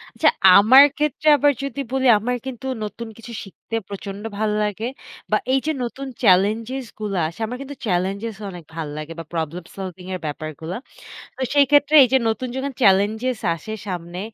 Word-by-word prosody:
আচ্ছা -, -, +4 dB, 0.3 s
আমার 250 Hz, +7 st, +9 dB
ক্ষেত্রে 300 Hz, 0 st, -1 dB
আবার 290 Hz, 0 st, +4 dB
যদি 275 Hz, -1 st, -5 dB
বলি 265 Hz, 0 st, +1 dB
আমার 245 Hz, +4 st, -1 dB
কিন্তু 265 Hz, -1 st, -7 dB, 0.2 s
নতুন 230 Hz, +2 st, -6 dB
কিছু 230 Hz, +1 st, -11 dB
শিখতে 200 Hz, +3 st, -8 dB
প্রচন্ড 200 Hz, 0 st, -7 dB
ভালো 215 Hz, 0 st, 0 dB
লাগে 210 Hz, +1 st, -3 dB, 0.5 s
বা -, -, +4 dB, 0.2 s
এইযে 270 Hz, +4 st, +1 dB
নতুন 270 Hz, +3 st, -5 dB, 0.2 s
চেলেঞ্জস 220 Hz, +8 st, +2 dB
গুলা 205 Hz, -3 st, -2 dB
আসে 170 Hz, +5 st, -11 dB
আমার 245 Hz, +3 st, -5 dB
কিন্তু 280 Hz, +1 st, -7 dB
চেলেঞ্জস 195 Hz, +4 st, -1 dB
অনেক 175 Hz, -3 st, -9 dB
ভাল 165 Hz, -2 st, -4 dB
লাগে 155 Hz, +1 st, -6 dB
বা -, -, -5 dB
প্রবলেম 165 Hz, +1 st, -3 dB
সলভিং 185 Hz, -2 st, -7 dB
এর -, -, -5 dB
ব্যাপারগুলা। 155 Hz, +3 st, -5 dB, 0.6 s
তো -, -, -7 dB
সেই 285 Hz, -1 st, +6 dB
ক্ষেত্রে 290 Hz, +1 st, +5 dB
এইযে 260 Hz, +1 st, +3 dB
নতুন 240 Hz, +3 st, -2 dB
যখন 270 Hz, +1 st, -3 dB
চেলেঞ্জস 215 Hz, +4 st, +3 dB, 0.2 s
আসে 190 Hz, +7 st, -8 dB
সামনে 175 Hz, -1 st, -5 dB
215 Hz, 165 wpm, -22 LUFS, 185-260 Hz, 0.6 s, আমার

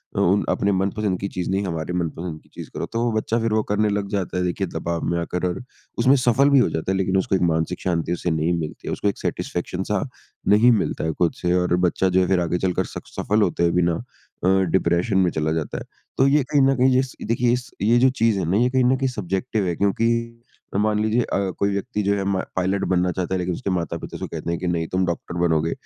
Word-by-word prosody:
उ -, -, 0 dB
उन 100 Hz, +4 st, +3 dB
अपने 100 Hz, -, +1 dB
मनपसंद 95 Hz, 0 st, 0 dB
की 100 Hz, -, -2 dB
चीज़ 90 Hz, -2 st, -4 dB
नहीं 95 Hz, +1 st, 0 dB
हमारे 85 Hz, -1 st, -3 dB
मनपसंद 85 Hz, -1 st, -3 dB
की -, -, -27 dB
चीज़ -, -, -8 dB
करो। -, -, -3 dB
तो 115 Hz, -, 0 dB
वो 120 Hz, -, +1 dB
बच्चा 110 Hz, +1 st, 0 dB
फिर 115 Hz, -1 st, 0 dB
वो 110 Hz, -, +3 dB
करने 105 Hz, +1 st, +2 dB
लग 100 Hz, -1 st, -1 dB
जाता 95 Hz, -3 st, -2 dB
है 90 Hz, -, 0 dB
देखिए 90 Hz, +2 st, -1 dB
दबाव 85 Hz, 0 st, -3 dB
में 85 Hz, -, 0 dB
आकर 90 Hz, +2 st, -2 dB
और 90 Hz, +4 st, -3 dB, 0.4 s
उसमें 130 Hz, +4 st, +5 dB
सफ़ल 130 Hz, +1 st, +3 dB
भी 140 Hz, -1 st, +6 dB
हो 125 Hz, -, +3 dB
जाता 80 Hz, +3 st, -2 dB
है, 95 Hz, -, 0 dB
लेकिन 95 Hz, 0 st, +1 dB
उसको 95 Hz, 0 st, +1 dB
एक -, -, 0 dB
मानसिक 85 Hz, +1 st, 0 dB
शांति 85 Hz, -2 st, -1 dB
उसे 90 Hz, 0 st, -2 dB
नहीं 80 Hz, +2 st, +1 dB
मिलती 75 Hz, -2 st, -6 dB
है। -, -, -2 dB
उसको -, -, -2 dB
एक 100 Hz, -, -4 dB
सैटिस्फैक्शन -, -, -3 dB
सा -, -, -1 dB, 0.4 s
नहीं 110 Hz, +4 st, +6 dB
मिलता 110 Hz, -, 0 dB
है 80 Hz, -, 0 dB
खुद 85 Hz, -2 st, +2 dB
से। 90 Hz, -1 st, 0 dB
और 90 Hz, -1 st, +2 dB
बच्चा 95 Hz, +2 st, +1 dB
जो 90 Hz, +1 st, +3 dB
है 90 Hz, -, +1 dB
फिर 95 Hz, -1 st, +2 dB
आगे 85 Hz, +1 st, 0 dB
चलकर 90 Hz, 0 st, 0 dB
सक -, -, -9 dB
सफ़ल 105 Hz, +1 st, 0 dB
होते 85 Hz, -4 st, +1 dB
हुए 85 Hz, -, +3 dB
भी 90 Hz, -, +2 dB
ना 85 Hz, 0 st, +2 dB, 0.5 s
अ, -, -, +2 dB, 0.2 s
डिप्रेशन 90 Hz, +3 st, +2 dB
में 95 Hz, -2 st, +4 dB
चला 80 Hz, 0 st, -1 dB
जाता 80 Hz, -2 st, -3 dB
है। -, -, -5 dB, 0.3 s
तो 135 Hz, -, +4 dB
ये 145 Hz, +1 st, +4 dB
कहीं 145 Hz, -, +5 dB
न 135 Hz, 0 st, +4 dB
कहीं 130 Hz, 0 st, +4 dB
इस 130 Hz, -1 st, -3 dB
ये -, -, -5 dB
देखिए 120 Hz, +1 st, +2 dB
इस 125 Hz, 0 st, -3 dB
ये 115 Hz, +4 st, +4 dB
जो 130 Hz, +2 st, +5 dB
चीज़ 115 Hz, -5 st, +1 dB
है -, -, -1 dB
ना, 95 Hz, -, +2 dB
ये 125 Hz, +3 st, +3 dB
कहीं 130 Hz, 0 st, +2 dB
न 130 Hz, +2 st, +4 dB
कहीं 135 Hz, 0 st, 0 dB
सब्ज़ेक्टिव 105 Hz, 0 st, -2 dB
है 85 Hz, -, -1 dB
क्योंकि 100 Hz, +4 st, +1 dB, 0.7 s
मान 105 Hz, +1 st, +2 dB
लीजिए 110 Hz, +3 st, +2 dB
अ, 100 Hz, -4 st, -1 dB
कोई 100 Hz, -, +2 dB
व्यक्ति 105 Hz, +2 st, -2 dB
जो 100 Hz, +1 st, +2 dB
है 100 Hz, -, -1 dB
मा 100 Hz, -1 st, 0 dB, 0.2 s
पायलट 95 Hz, +2 st, 0 dB
बनना 90 Hz, 0 st, +2 dB
चाहता 90 Hz, +1 st, -3 dB
है -, -, +1 dB
लेकिन 90 Hz, 0 st, -1 dB
उसके 100 Hz, -, -4 dB
माता-पिता 85 Hz, -4 st, -3 dB
उसे -, -, -5 dB
कहते -, -, -4 dB
है 85 Hz, -, -1 dB
कि 90 Hz, -, -4 dB
नहीं, 85 Hz, -2 st, -1 dB
तुम 95 Hz, +2 st, 0 dB
डॉक्टर 85 Hz, 0 st, -4 dB
बनोगे। 80 Hz, 0 st, +1 dB
95 Hz, 260 wpm, -22 LUFS, 85-110 Hz, 0.7 s, भी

